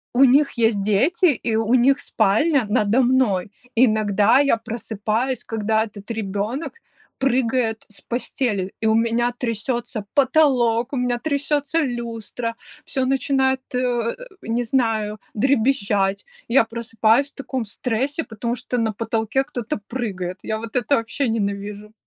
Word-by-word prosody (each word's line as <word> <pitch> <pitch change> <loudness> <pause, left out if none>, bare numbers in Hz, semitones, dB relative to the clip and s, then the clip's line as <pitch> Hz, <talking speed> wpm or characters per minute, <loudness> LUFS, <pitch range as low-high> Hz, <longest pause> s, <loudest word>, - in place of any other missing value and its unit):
У 265 - +6
них 275 +3 +5
есть 225 -4 +1
дети, 260 - +2
и 240 -8 +2
у 225 +1 +1
них 270 +3 +4
спальня 235 +5 +2
надо 215 +2 +3
мной. 240 -7 +2 0.2
Иногда 215 0 +4
я 280 -4 +4
просыпаюсь, 225 +2 -3
когда 220 0 0
этот 210 -1 -10
ребенок 220 +6 -3 0.5
прыгает 250 -3 +1
с 210 - -9
постели, 235 -5 -2
и 220 - 0
у 220 - +4
меня 235 +1 +1
трясется 230 -2 -3
потолок, 255 -4 +3
у - - -1
меня 245 -1 0
трясется 290 +2 0
люстра, 235 -3 -3 0.3
всё 265 -1 -1
начинает, 265 0 +1 0.2
э, 240 -2 0 0.3
не 235 +2 -1
знаю, 220 -4 0
дребезжать. 215 -5 +1 0.2
Я 245 0 +5
просыпаюсь 230 +3 +1
в - - -40
таком 260 -3 -4
стрессе, 255 +8 -2
потому 235 0 -4
что 250 - -4
на 220 -2 0
потолке 225 +4 -1
кто-то 245 +2 -4
прыгает. 190 -7 -4
Я 220 - -2
вот 230 +2 -4
это 250 +4 +2
вообще 235 +3 -1
ненавижу! 205 -1 -3
235 Hz, 135 wpm, -22 LUFS, 220-260 Hz, 0.5 s, У